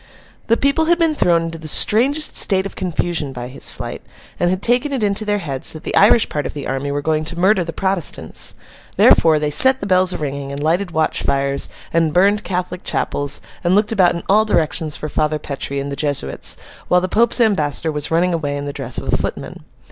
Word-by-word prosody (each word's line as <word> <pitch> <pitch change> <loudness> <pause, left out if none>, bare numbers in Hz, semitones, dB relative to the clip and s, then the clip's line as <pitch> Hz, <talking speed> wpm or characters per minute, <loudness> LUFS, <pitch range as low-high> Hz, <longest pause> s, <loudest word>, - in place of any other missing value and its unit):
The 230 - +3
people 280 +4 +1
had 345 +1 +3
been 330 -2 +2
thrown 170 - +2
into 165 0 -6
the 160 - -7
strangest 265 - +3
state 190 -2 +2
of 195 - -7
confusion 170 -4 -2
by 125 -1 -7
his 130 - -5
flight, - - -7 0.4
and 175 - +2
had 185 +1 -2
taken 245 +5 +1
it 260 -5 -2
into 205 +1 0
their 205 0 0
heads 140 -9 -5
that 155 - -10
the - - -3
Irish 220 +2 +5
part 150 -1 -3
of - - -9
the 145 - -6
army 135 +2 -3
were 145 0 -3
going 155 0 0
to 170 +1 -2
murder 190 +1 +3
the 165 - -5
Protestants. 190 -2 -1 0.4
Therefore, 160 -2 +5
they 150 0 -1
set 265 - +5
the - - -5
bells 185 -1 +3
a - - -3
ringing, 140 -2 -5
and 140 +1 -5
lighted 175 +5 0
watch 160 -2 0
fires, 140 0 0 0.2
and 165 -1 +1
burned 200 +3 +3
Catholic 180 -1 -4
Chapels, 145 0 -1 0.2
and 175 +1 +2
looked 210 +1 +2
about 185 -5 +3
in 170 - -6
all 210 +2 +4
directions 160 -6 -1
for 155 - -5
Father 155 +1 -1
Petre 140 -1 -5
and 140 +1 -5
the - - -3
Jesuits, 140 - -2 0.3
while 180 - +4
the 185 - -2
Pope's 230 +6 +2
ambassador 160 - +1
was 150 -1 -3
running 175 +2 +1
away 145 -3 -2
in 145 - -5
the 145 - -5
dress - - -4
of - - -4
a - - +1
footman. - - -5
170 Hz, 225 wpm, -18 LUFS, 150-200 Hz, 0.4 s, Irish